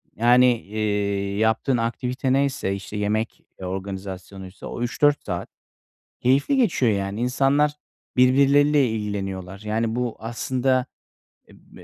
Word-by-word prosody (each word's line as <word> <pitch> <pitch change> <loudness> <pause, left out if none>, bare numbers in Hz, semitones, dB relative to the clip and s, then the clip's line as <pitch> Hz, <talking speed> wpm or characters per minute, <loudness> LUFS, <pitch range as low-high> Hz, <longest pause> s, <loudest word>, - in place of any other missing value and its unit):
yani, 120 +3 +5 0.2
eee, 100 -1 -2
yaptığın 110 +4 +1
aktivite 125 +3 -1
neyse, 135 -8 0
işte, 100 +2 -7
yemek 105 +2 -2 0.2
organizasyonuysa 95 0 -7
o 120 - -6
3-4 145 +4 +1
saat 90 -1 -4 0.7
keyifli 140 - +2
geçiyor, 165 - +2
yani. 100 +2 -2
İnsanlar 140 +4 +2 0.4
birbirleriyle 140 +2 +5
ilgileniyorlar. 95 -3 -4
Yani, 110 +1 -1
bu 125 -2 -2
aslında, 125 +3 0 0.9
eee, - - -13
115 Hz, 105 wpm, -23 LUFS, 100-130 Hz, 0.9 s, yani